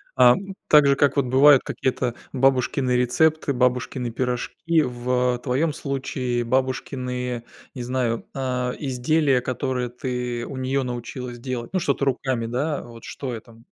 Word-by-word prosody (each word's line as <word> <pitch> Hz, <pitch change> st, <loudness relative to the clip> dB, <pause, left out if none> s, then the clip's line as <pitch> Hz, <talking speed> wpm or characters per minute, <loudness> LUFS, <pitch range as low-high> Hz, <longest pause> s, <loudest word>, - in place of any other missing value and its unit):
Ам, 135 Hz, +10 st, +4 dB
так 150 Hz, -2 st, +6 dB
же, 140 Hz, -, +4 dB
как 140 Hz, 0 st, +2 dB
вот 140 Hz, -2 st, +2 dB
бывают 135 Hz, +2 st, +6 dB
какие-то 125 Hz, -2 st, -2 dB, 0.2 s
бабушкины 130 Hz, 0 st, +2 dB
рецепты, 145 Hz, +5 st, +2 dB
бабушкины 125 Hz, 0 st, 0 dB
пирожки. 130 Hz, +7 st, 0 dB
В 125 Hz, -1 st, 0 dB
твоём 145 Hz, +4 st, +1 dB
случае 130 Hz, -4 st, -2 dB
бабушкины, 125 Hz, -1 st, -2 dB, 0.3 s
не 125 Hz, -, -4 dB
знаю, 120 Hz, -2 st, -1 dB
а 125 Hz, -2 st, -2 dB
изделия, 135 Hz, 0 st, +1 dB
которые 130 Hz, -1 st, -2 dB
ты 125 Hz, -1 st, -3 dB
у 135 Hz, -, -7 dB
неё 130 Hz, +1 st, 0 dB
научилась 125 Hz, 0 st, -5 dB
делать. 120 Hz, -1 st, -5 dB
Ну 185 Hz, -, +2 dB
что-то 140 Hz, -4 st, 0 dB
руками, 130 Hz, -3 st, -1 dB
да, 140 Hz, +6 st, -1 dB
вот 115 Hz, -1 st, -12 dB
что 130 Hz, -3 st, -5 dB
это? 115 Hz, 0 st, -10 dB
125 Hz, 140 wpm, -23 LUFS, 125-135 Hz, 0.3 s, так